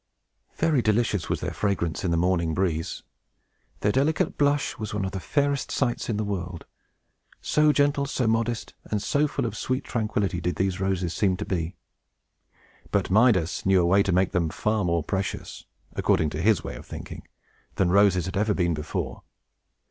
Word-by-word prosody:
Very 155 -5 +2
delicious 105 -4 +1
was - - -1
their - - -3
fragrance 95 -5 -1
in 90 - 0
the 85 - +1
morning 85 -2 +1
breeze. 85 -4 -1 0.8
Their 105 - +2
delicate 140 +7 +1
blush 145 -2 +1
was 105 -1 -4
one 100 -2 -1
of 95 - -3
the 95 - -4
fairest 140 +6 0
sights 120 -3 -1
in 110 - 0
the 110 - 0
world; 90 -4 -4 0.7
so 150 0 +3
gentle, 145 -1 +2
so 130 -2 -1
modest, 115 +1 0
and 105 - -1
so 145 +8 +1
full 135 -2 -2
of 110 -2 -3
sweet 130 +4 -2
tranquillity, 105 -6 -1
did 90 -1 -1
these 95 +1 -1
roses 95 -3 -1
seem 95 -3 +1
to 105 - -4
be. 85 -1 -2 1.1
But 95 -2 0
Midas 95 -6 +3
knew 95 -1 +4
a 85 - +3
way 95 +3 +4
to 100 - 0
make 90 +1 +2
them 85 -4 +1
far 105 +5 0
more 85 -2 +1
precious, 95 +4 -4 0.3
according 80 -2 +1
to 75 - -3
his 100 -2 +3
way - - -5
of - - -11
thinking, - - -8 0.5
than 90 -2 +2
roses 95 -3 +4
had 95 - -5
ever 105 +1 +1
been 85 -2 +1
before. 75 0 -4
100 Hz, 180 wpm, -26 LUFS, 90-115 Hz, 1.1 s, knew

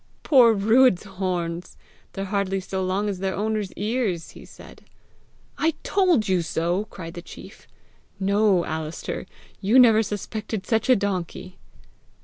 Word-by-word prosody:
"Poor 245 -6 +6
Ruadh's 220 0 +4
horns! 180 -3 -4 0.4
they're 195 - -4
hardly 195 -1 -1
so 190 0 -4
long 190 +3 -1
as 195 -3 -3
their 190 0 -2
owner's 210 -2 -2
ears!" 210 -6 -2
he - - -13
said. - - -14 0.8
"I 320 +1 +1
told 370 - +2
you 185 -2 +2
so!" 175 +4 -1
cried 165 -5 -9
the 175 - -7
chief. - - -13 0.5
"No, 200 -2 +2
Alister! 155 0 -5 0.3
You 215 +6 +3
never 225 -4 +7
suspected 210 -1 -4
such 225 +3 0
a 255 - +7
donkey!" 185 -2 -4
195 Hz, 135 wpm, -24 LUFS, 185-220 Hz, 0.8 s, never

